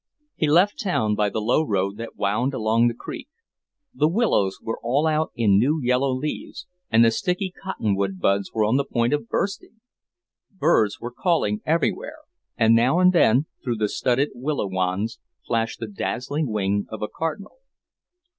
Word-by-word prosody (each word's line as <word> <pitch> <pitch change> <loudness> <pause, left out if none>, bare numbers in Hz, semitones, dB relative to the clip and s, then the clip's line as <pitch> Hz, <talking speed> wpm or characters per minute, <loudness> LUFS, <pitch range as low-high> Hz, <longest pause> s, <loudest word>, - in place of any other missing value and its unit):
He 155 - 0
left 180 +7 +3
town 140 - 0
by 105 0 +1
the 110 - -3
low 115 +8 +2
road 100 -7 -1
that 115 0 -7
wound 120 +7 0
along 115 0 +2
the 120 - -1
creek. 250 - -8 0.6
The 155 - +2
willows 160 - +1
were 115 - -5
all 135 +6 +1
out 155 0 +1
in 100 -4 +3
new 145 +8 +2
yellow 130 +1 +1
leaves, 135 +7 -4 0.2
and 115 +1 +5
the 115 - +4
sticky 180 - -1
cotton 115 - -1
wood 95 -1 -2
buds 100 +2 +1
were 110 -1 +1
on 110 +5 +2
the 140 - +1
point 120 -1 0
of 150 +11 -2
bursting. 200 +3 -3 0.7
Birds 150 - +1
were 120 - -6
calling 120 - 0
everywhere, 165 - 0 0.4
and 115 -1 +4
now 120 +8 +3
and 180 0 +5
then, 135 -4 +4 0.2
through 120 -3 -2
the 105 -1 +1
studded 130 +6 0
willow 135 0 -2
wands, 95 +4 -2 0.3
flashed 115 -1 -1
the 115 - -4
dazzling 125 +9 -3
wing 100 -1 0
of 110 -1 -6
a - - -1
cardinal. 165 - -5
120 Hz, 175 wpm, -23 LUFS, 105-155 Hz, 0.7 s, and